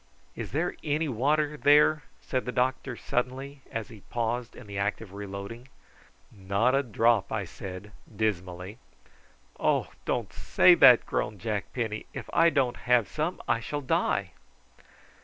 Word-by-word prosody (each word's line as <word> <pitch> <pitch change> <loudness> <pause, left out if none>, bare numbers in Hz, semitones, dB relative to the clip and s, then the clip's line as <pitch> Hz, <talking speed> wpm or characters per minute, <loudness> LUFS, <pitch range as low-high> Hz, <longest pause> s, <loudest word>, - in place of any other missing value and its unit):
"Is - - -5
there 160 +6 -1
any 155 +1 0
water 145 +4 +1
there?" 150 +1 +5 0.2
said 130 -1 -2
the 125 - -2
doctor 130 0 -1
suddenly, 135 +3 -3
as 115 -2 -4
he 110 -3 -12
paused 120 0 -2
in - - -11
the 100 -1 -5
act 100 +1 0
of 105 -4 -11
reloading. 100 +4 -7 0.6
"Not 100 +6 0
a 135 - +3
drop," 115 -3 +2
I - - -2
said, 95 +2 -8 0.2
dismally. 95 -1 -3 0.8
"Oh! - - +1 0.2
don't - - -2
say - - +5
that," - - +7
groaned 105 - -2
Jack 105 -2 -3
Penny. 110 -3 -3
"If - - -7
I 165 0 +5
don't 135 -6 +1
have 120 -3 +2
some 155 +4 -3
I 115 - +2
shall 145 +5 -4
die." 130 - 0
120 Hz, 150 wpm, -28 LUFS, 105-140 Hz, 0.8 s, that